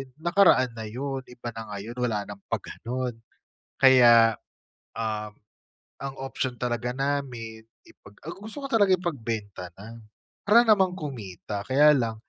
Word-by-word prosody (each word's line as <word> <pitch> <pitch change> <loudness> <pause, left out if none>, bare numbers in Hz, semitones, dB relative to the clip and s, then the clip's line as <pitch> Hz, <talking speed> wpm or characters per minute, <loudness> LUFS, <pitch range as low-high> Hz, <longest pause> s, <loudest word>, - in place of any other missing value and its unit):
nakaraan 165 -6 +4
na 110 -1 -7
yun, 135 +4 -4
iba 120 -1 -8
na 115 -1 -8
ngayon, 115 +5 -7
wala 110 -4 0
ng 100 0 -10
pa-ganon. 125 -1 -4 0.6
Kaya, 120 -4 +7 0.6
uhm, 105 -2 -4 0.6
ang 135 -1 -6
option 130 -1 -3
talaga 120 0 -2
namin 125 -5 -3 0.2
ipag 100 - -18 0.2
ah, - - -4
gusto 220 +8 -9
ko 275 - -4
talaga 205 -6 +4
ipagbenta 110 - -4
na, 110 +5 -11 0.5
para 225 +3 +7
naman 195 -5 +4
kumita. 105 - -6
Kaya 150 +3 +5
lang 115 -3 -1
125 Hz, 130 wpm, -26 LUFS, 110-140 Hz, 0.6 s, Kaya